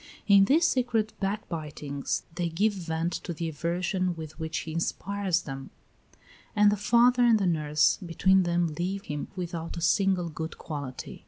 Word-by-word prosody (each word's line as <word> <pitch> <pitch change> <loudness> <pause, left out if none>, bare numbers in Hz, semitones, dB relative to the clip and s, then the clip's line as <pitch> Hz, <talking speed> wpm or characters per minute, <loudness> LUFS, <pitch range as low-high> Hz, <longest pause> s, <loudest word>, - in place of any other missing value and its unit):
In 200 -2 +6
these 320 - +4
secret 235 -6 0
backbitings 155 -8 -3
they 175 0 -1
give 205 +6 +1
vent 165 -2 -2
to 175 - -4
the 165 +1 -3
aversion 175 +3 -1
with 160 0 -9
which 160 0 -3
he 160 - -7
inspires 185 +2 -1
them; 135 -1 -7 0.9
and 210 0 +5
the - - +2
father 240 +4 +4
and 235 -2 +6
the 200 - 0
nurse 155 -3 +2
between 190 +2 +3
them 175 -1 +1
leave 195 +3 -2
him 150 -1 -4
without 170 -2 -5
a - - -4
single 185 0 +2
good 160 +1 -6
quality. 145 -5 -6
175 Hz, 160 wpm, -28 LUFS, 160-200 Hz, 0.9 s, In